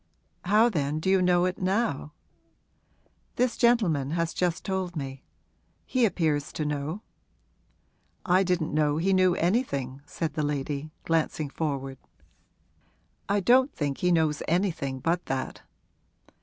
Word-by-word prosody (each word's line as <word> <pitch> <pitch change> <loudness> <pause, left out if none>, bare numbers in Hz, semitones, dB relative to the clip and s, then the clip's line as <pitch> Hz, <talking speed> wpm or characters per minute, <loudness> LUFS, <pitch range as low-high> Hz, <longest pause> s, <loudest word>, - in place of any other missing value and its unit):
'How 210 +5 +5
then 150 -8 -1
do 190 +4 0
you 190 -1 +4
know 180 -1 +3
it 185 0 -2
now?' 190 - -1 1.2
'This 250 0 +1
gentleman 205 - +2
has 165 -1 -1
just 175 -2 -1
told 190 -2 -2
me 135 -3 -5 0.6
he 255 -2 +2
appears 155 -8 0
to 155 - -2
know.' 150 +7 -3 1.2
'I 185 +1 +4
didn't 180 -5 0
know 150 -1 +2
he 190 +4 +2
knew 185 -1 +4
anything,' 140 - -1
said 160 0 -3
the 155 - -1
lady, 145 0 -2 0.2
glancing 160 -3 0
forward. 135 -4 -3 1.3
'I 200 0 +2
don't 255 +8 +4
think 145 -3 -2
he 180 - +2
knows 160 -3 +2
anything 165 -7 0
but 170 +1 -1
that.' 130 -1 -3
165 Hz, 130 wpm, -27 LUFS, 145-190 Hz, 1.3 s, How